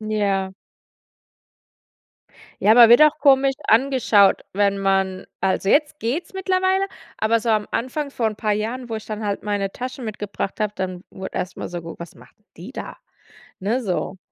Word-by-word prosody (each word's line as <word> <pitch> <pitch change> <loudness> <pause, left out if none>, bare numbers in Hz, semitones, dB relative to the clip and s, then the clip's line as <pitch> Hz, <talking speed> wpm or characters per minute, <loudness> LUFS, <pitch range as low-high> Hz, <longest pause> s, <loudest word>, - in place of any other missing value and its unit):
Ja. 200 -3 -1 2.1
Ja, 215 +2 +6
man 240 -1 +9
wird 240 - +8
auch 305 0 +5
komisch 270 -1 +4
angeschaut, 230 -5 +4
wenn 200 0 +1
man 195 -1 0
also 190 0 0
jetzt 300 +4 +2
geht's 275 +12 -3
mittlerweile, 380 0 +1 0.3
aber 225 +1 +2
so 230 +1 -1
am 215 -1 +1
Anfang, 280 +4 -3
von 225 -5 -1
'n 210 - -14
paar 215 -1 0
Jahren, 230 +4 -3
wo 225 - -3
ich 220 - -9
dann 215 0 -5
halt 200 -1 -3
meine 205 -2 -1
Taschen 255 +3 -6
mitgebracht 205 -2 -5
habe, 210 -1 -1
dann 185 -1 -5
wurde 190 -1 -8
erstmal 180 - -5
so, 175 -1 -5
ge 165 - -8
was 170 -1 -10
macht 125 +1 -18 0.2
die 190 +10 -10
da? - - -7 0.6
Ne? 225 +7 -1
So. 190 -2 -3
215 Hz, 170 wpm, -22 LUFS, 195-255 Hz, 2.1 s, man